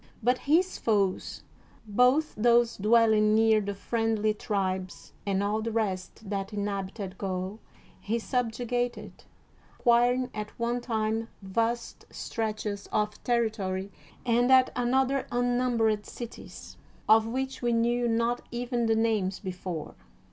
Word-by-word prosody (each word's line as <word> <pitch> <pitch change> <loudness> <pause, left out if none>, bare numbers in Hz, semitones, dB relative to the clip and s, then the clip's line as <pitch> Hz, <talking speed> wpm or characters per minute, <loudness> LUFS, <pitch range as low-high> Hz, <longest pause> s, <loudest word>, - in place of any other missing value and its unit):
But 250 +2 +3
his 360 +5 +3
foes, 200 -4 0 0.4
both 250 +8 +3
those 235 +1 +3
dwelling 215 0 +4
near 220 -1 +4
the 200 0 -4
friend 225 +1 -1
ly 215 - +4
tribes, 190 -3 -3
and 195 0 +1
all 210 +2 0
the 230 +1 -3
rest 210 -1 -3
that 195 -1 -3
inhabited 200 -1 -4
Gaul, 190 +2 -3 0.4
he 225 +3 -1
subjugated, 245 0 -2 0.5
acquiring 245 +1 +3
at 210 0 -6
one 240 +1 -1
time 225 -1 -1 0.2
vast 230 +4 -2
stretches 215 -2 -4
of 210 0 -1
territory 210 -5 -1 0.3
and 245 +1 +3
at 260 -1 +6
another 265 +2 +1
unnumbered 245 -3 +1
cities, 235 -2 -9 0.3
of 220 +1 +6
which 265 +3 -3
we 240 -1 +1
knew 240 +1 +2
not 235 +1 +1
even 240 -1 -1
the 225 - +3
names 215 -4 +1
be 190 - -4
fore. 180 -3 -6
225 Hz, 125 wpm, -28 LUFS, 205-240 Hz, 0.5 s, at